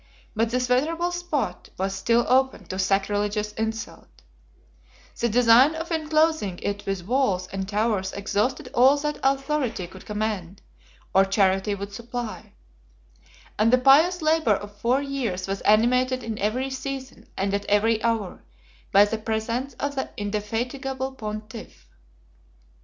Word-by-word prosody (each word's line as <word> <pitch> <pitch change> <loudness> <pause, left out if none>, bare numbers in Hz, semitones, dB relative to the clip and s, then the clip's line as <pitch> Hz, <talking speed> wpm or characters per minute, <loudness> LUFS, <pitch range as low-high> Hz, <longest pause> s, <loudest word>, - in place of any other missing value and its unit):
But 225 +1 +1
this 250 +1 0
venerable 325 +8 +1
spot 315 - -3
was 190 +1 -1
still 230 +5 +2
open 260 -5 +2
to 185 - -4
sacrilegious 205 +2 0
insult: 220 +1 -6 1.0
the 235 - +1
design 245 +6 +5
of 330 +2 -5
enclosing 310 - +1
it 205 0 -3
with 195 -3 -3
walls 205 -6 +1
and 195 0 -4
towers 205 -2 0
exhausted 215 +7 -1
all 265 +3 +5
that 295 +1 -3
authority 270 -6 0
could 185 +2 -13
command, 210 -3 -3 0.5
or 195 - +6
charity 195 +1 +1
would 200 +1 -7
supply: 235 0 -6 1.1
and 220 +2 +4
the 255 - +6
pious 310 +7 +5
labor 310 -8 +3
of 205 +1 -8
four 245 +6 +1
years 240 -10 -3
was 195 0 -3
animated 250 +4 +3
in 225 -2 -5
every 250 +6 -1
season, 265 0 -6
and 195 +1 -1
at 200 0 -1
every 220 +2 +2
hour, 225 -5 -1 0.5
by 200 +1 +7
the 220 +1 -3
presence 230 +4 -3
of 285 +3 -3
the 265 -1 -3
indefatigable 245 +6 -3
pontiff. 215 -2 -8
225 Hz, 135 wpm, -24 LUFS, 205-265 Hz, 1.1 s, by